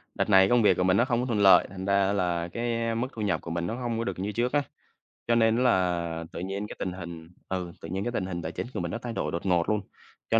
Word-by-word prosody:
đợt - - 0
này 95 -1 +6
công 120 -1 +4
việc 100 -4 +4
của 90 - +2
mình 95 +1 +3
nó 120 - +4
không 120 -3 0
có 125 - -1
thuận 115 -4 -1
lợi, 100 -1 +7
thành 95 0 -7
ra 100 0 +2
là 90 -3 0
cái 115 -1 -1
mức 120 +3 -1
thu 110 - -6
nhập 95 -6 0
của 85 - -7
mình 85 0 -2
nó 115 - -3
hông 120 -2 -3
có 115 - -1
được 115 - -4
như 100 +3 -2
trước 120 +4 -1
á, 145 - +3 0.7
cho 120 - +3
nên 115 -1 +4
á - - +1
là 85 -7 +1
tự - - -6
nhiên 95 +3 -4
cái - - -8
tình 95 - -2
hình, 85 -2 -8 0.2
ừ, 90 -2 -3
tự 80 - -8
nhiên 95 +3 -2
cái 120 - -2
tình 100 - -2
hình 85 -2 -4
tài 80 0 -4
chính - - -5
của - - -3
mình 85 -1 -3
nó - - -2
thay 120 -2 -5
đổi 75 - -2
đột 85 - -4
ngột 90 -3 +2
luôn, 105 -1 +1 0.5
cho 115 - +4
100 Hz, 305 wpm, -27 LUFS, 90-115 Hz, 0.7 s, lợi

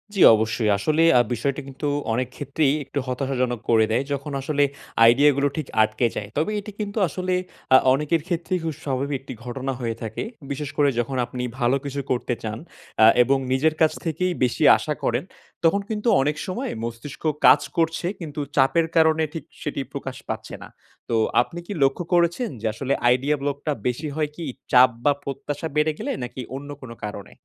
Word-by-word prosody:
জি, 195 - +1
অবশ্যই। 110 0 0
আসলে 155 +10 +1 0.2
আ - - +7
বিষয়টা 140 +5 -2
কিন্তু 135 +2 -5 0.3
অনেক 125 +2 0
ক্ষেত্রেই 140 0 +1
একটু 140 +1 -4
হতাশাজনক 125 -2 -1
করে 110 -1 +5
দেয়। 120 +5 +2
যখন 140 +1 -4
আসলে 145 +1 +1 0.5
idea 140 +5 +5
গুলো 140 - +3
ঠিক 155 -4 -3
আটকে 110 +2 +1
যায়। 105 - -4
তবে 160 +8 +1
এটি 210 +1 -8
কিন্তু 205 0 -4
আসলে 185 +3 -2 0.4
আ - - +11 0.2
অনেকের 150 +3 +1
ক্ষেত্রেই 180 +1 -1
খুব 160 -2 -2
স্বাভাবিক 140 +1 -1
একটি 135 - -8
ঘটনা 130 +2 -3
হয়ে 115 -2 -2
থাকে। 110 -1 -4 0.3
বিশেষ 145 0 -3
করে 145 -1 +4
যখন 130 +2 -2
আপনি 125 0 -5 0.2
ভালো 120 +2 +3
কিছু 140 0 -3
করতে 125 0 0
চান 110 0 -3 0.4
অ্যা 110 - +7 0.2
এবং 135 +3 +2
নিজের 155 +4 +2
কাছ 160 - +5
থেকেই 180 +3 0
বেশি 125 +5 +1
আশা 150 - -2
করেন, 120 +5 0 0.4
তখন 185 +5 +3
কিন্তু 215 +1 -3
অনেক 150 +2 0
সময় 240 +9 -3
মস্তিষ্ক 120 +6 -7 0.2
কাজ 145 - +8 0.2
করছে 165 +1 +1
কিন্তু 155 -4 -6 0.2
চাপের 155 +5 +3
কারণে 160 0 +4
ঠিক 160 -4 -5 0.2
সেটি 145 -2 -3
প্রকাশ 135 -2 -5
পাচ্ছে - - -5
না। - - -10 0.4
তো 115 - +1 0.3
আপনি 170 +7 -6
কি 205 - -4
লক্ষ্য 135 +6 +1
করেছেন 175 +7 +2
যে - - -5
আসলে 135 +4 -1 0.2
idea 135 +4 +1
block 140 0 -1
টা 150 - +2
বেশি 135 +6 -2
হয় 155 -1 0
কি 170 - -7 0.3
চাপ 125 0 +7 0.2
বা 145 - +6
প্রত্যাশা 140 +3 -4
বেড়ে 150 +1 +3
গেলে, - - -2
নাকি 125 +1 -6
অন্য 140 +1 -7
কোনো 115 -2 -9
কারণে? 105 -1 -7
140 Hz, 185 wpm, -23 LUFS, 125-160 Hz, 0.5 s, আ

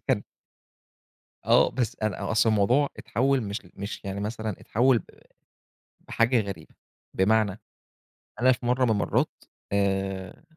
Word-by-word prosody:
كان - - +2 1.2
آه، - - +5
بس 120 -3 -2
أنا 110 -1 -2
أصلًا 110 0 +3
الموضوع 120 +8 +3
اتحول 135 +4 +1
مش 100 +1 -4
مش 100 +2 -6
يعني 100 0 -4
مثلًا 110 +1 -3
اتحول 125 +2 +3
ب - - -12 1.0
بحاجة 115 +1 +2
غريبة، 95 -6 -8 0.4
بمعنى 105 +1 +2 0.8
أنا 130 +1 +6
في 120 0 -2
مرّة 125 +1 +2
من 115 - +2
المرّات 105 -2 0 0.3
آآ، 95 - -1
110 Hz, 125 wpm, -26 LUFS, 100-120 Hz, 1.2 s, أنا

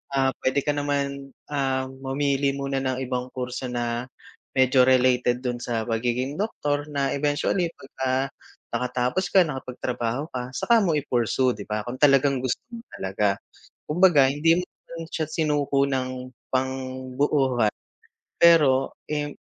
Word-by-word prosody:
ah, 135 -1 +3
puwede 135 +2 +1
ka 145 - +1
naman, 140 -1 -2 0.2
ah, 130 -2 -1
mamili 135 +1 0
muna 140 -1 -2
ng 130 0 -2
ibang 125 0 -3
kurso 125 0 -4
na 120 0 -2 0.5
medyo 130 0 +5
related 125 -1 +3
dun 120 -1 -2
sa 115 -2 -2
pagiging 120 - -1
doktor 145 -9 -1
na 140 -2 -1
eventually 145 +5 +1
pagka 135 0 -2 0.4
nakatapos 125 +8 0
ka 185 0 +5
nakapagtrabaho 125 -3 -3
ka 125 -1 -4
saka 235 -1 +4
mo 180 -7 +2
i-pursue 130 -2 +1
'di 105 -4 -7
ba, 105 0 -2
kung 125 +1 -6
talagang 140 -1 +4
gusto 125 -1 -1
mo 235 - -7 0.2
talaga. 100 +1 0 0.5
Kumbaga 160 -4 +5
hindi 155 +5 +3
mo 180 - -1
naman 165 -2 -10
siya 155 - -1
sinuko 145 -3 +1
ng 130 -1 -3 0.2
pangbuohan 130 -1 0 0.7
pero, 145 -6 +5 0.2
im 150 -1 -2
130 Hz, 135 wpm, -25 LUFS, 125-145 Hz, 0.7 s, medyo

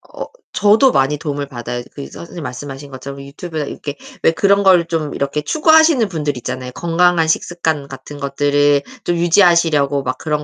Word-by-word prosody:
어 - - -5 0.3
저도 215 +6 +4
많이 135 +2 +1
도움을 145 -2 -4
받아요. 120 -1 -5
그 140 - -7
이 - - -8
선생님 170 -1 -9
말씀하신 135 +2 -8
것처럼 140 +1 -8
유튜브나 155 +2 -6
이렇게 145 0 -7 0.3
왜 - - +5
그런 200 +4 +2
걸 180 -3 +5
좀 160 -3 -2
이렇게 140 +2 -2
추구하시는 315 - +4
분들 150 -5 -2
있잖아요. 125 +1 -5
건강한 170 -1 +2
식습관 160 -3 -1
같은 140 +1 -10
것들을 145 0 +2 0.2
좀 175 - 0
유지하시려고 170 -6 +3
막 130 - -3
그런 150 -1 -2
150 Hz, 405 characters per minute, -17 LUFS, 140-175 Hz, 0.3 s, 왜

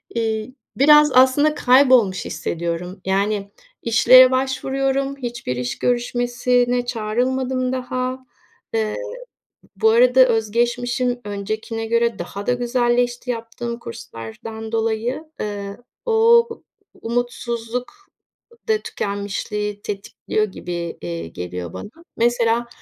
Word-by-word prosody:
eee, 220 0 -1 0.3
biraz 300 +1 +7
aslında 265 +4 +5
kaybolmuş 250 -8 +4
hissediyorum. 170 +3 -4
Yani, 200 +1 0 0.3
işlere 255 +3 +7
başvuruyorum. 270 +1 -1
Hiçbir 240 - -4
iş 125 0 -3
görüşmesine 245 0 +1
çağrılmadım 255 +3 -1
daha. 255 0 -3 0.5
Eee, 220 -1 0 0.8
bu 220 +3 +4
arada 250 +3 +5
öz 225 -3 0
geçmişim 245 +1 0
öncekine 215 +2 -4
göre 235 -1 +1
daha 195 +4 -6
da 245 - +3
güzelleşti 245 0 0
yaptığım 235 +1 -5
kurslardan 115 - -8
dolayı. 225 +6 -1 0.2
Eee, 200 -1 -5 0.3
o 465 +1 +5 0.5
umutsuzluk 240 - -3 0.8
da 440 - +4
tükenmişliği 205 - -4
tetikliyor 210 +1 -2
gibi, 175 -4 -6
eee, 85 -1 -5
geliyor 90 0 -6
bana. 95 - -7 0.3
Mesela 235 0 +2
235 Hz, 95 wpm, -21 LUFS, 210-255 Hz, 0.8 s, biraz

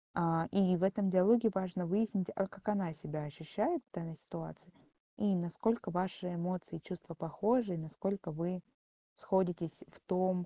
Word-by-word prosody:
Э, 165 -1 +2
и 190 -2 +5
в 175 - -5
этом 195 +1 +3
диалоге 220 +5 +6
важно 185 -1 -1
выяснить, 200 0 +1
а 195 - +1
как 195 +1 -15
она 195 -5 +1
себя 155 -1 -5
ощущает 165 - -1
в - - -31
данной 165 -3 -5
ситуации. 170 +3 -9 0.4
И 205 -2 +3
насколько 185 +5 0
ваши 180 0 -2
эмоции 175 -1 -3
и 160 - -11
чувства 175 -1 -7
похожи, 205 +7 +1
и - - -2
насколько 165 +3 -3
вы 175 +3 -2 0.5
сходитесь 180 -4 0
в - - -19
том, 185 -1 +1
185 Hz, 160 wpm, -35 LUFS, 170-195 Hz, 0.5 s, диалоге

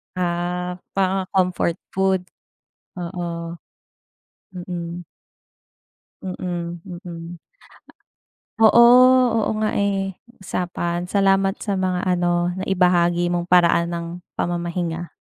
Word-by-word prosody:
Ah, 180 0 -2 0.2
parang 190 -1 +1
comfort 180 -2 +1 0.2
food? 190 -1 +1 0.8
oo. 170 -1 -5 1.0
Mm. 175 -1 -6 1.2
Mm, 175 -2 -5 0.3
mm. 170 0 -8 1.2
Oo, 225 +2 +7 0.7
oo - - +1
nga 215 0 0
eh, 195 -1 -1 0.2
usapan 175 -1 -3
salamat 195 -1 +2
sa 205 - -3
mga 185 -1 -1
ano 175 -1 +1
naibahagi 175 -2 +2
mong 175 0 -2
paraan 170 -1 +4
ng 170 -1 -4 0.3
pamamahinga. 170 -1 -2
180 Hz, 85 wpm, -22 LUFS, 175-190 Hz, 1.2 s, Oo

